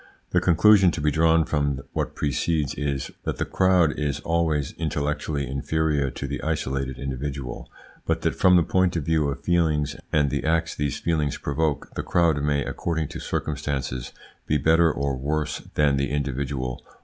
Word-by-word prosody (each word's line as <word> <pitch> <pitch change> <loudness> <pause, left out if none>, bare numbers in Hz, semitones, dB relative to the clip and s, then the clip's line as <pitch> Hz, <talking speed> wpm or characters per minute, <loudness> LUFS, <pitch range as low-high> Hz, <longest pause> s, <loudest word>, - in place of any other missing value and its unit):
The - - +3
conclusion 95 +3 +6
to - - -4
be 75 0 +2
drawn 80 +1 +3
from 70 -3 0
what - - -2
precedes 75 +1 0
is, 70 -2 -3
that - - -3
the - - -1
crowd 90 -5 +3
is 75 -1 -1
always 80 -4 0
intellectually 75 -2 -2
inferior 70 +1 0
to 70 - -6
the 70 +1 -4
isolated 70 -4 -2
individual, 70 -1 -5 0.4
but - - 0
that, - - +1
from 90 -1 +5
the 85 - +5
point 90 +1 +1
of 80 -4 -2
view 80 -2 +2
of 70 - -5
feelings 80 -4 +1 0.2
and 75 -2 +3
of 70 - -2
the 70 - -1
acts 80 +1 +1
these 70 -2 -2
feelings 75 -5 0
provoke, 75 0 -2
the - - -3
crowd 85 -4 +2
may, 70 -1 +1
according 80 -3 -2
to - - -7
circumstances, 70 -4 -3 0.4
he 75 - +2
better 80 +3 +4
or 70 -2 -1
worse 75 +4 -2 0.2
than 70 -2 +3
the 70 +1 0
individual. 70 -3 -3
75 Hz, 175 wpm, -24 LUFS, 70-80 Hz, 0.4 s, conclusion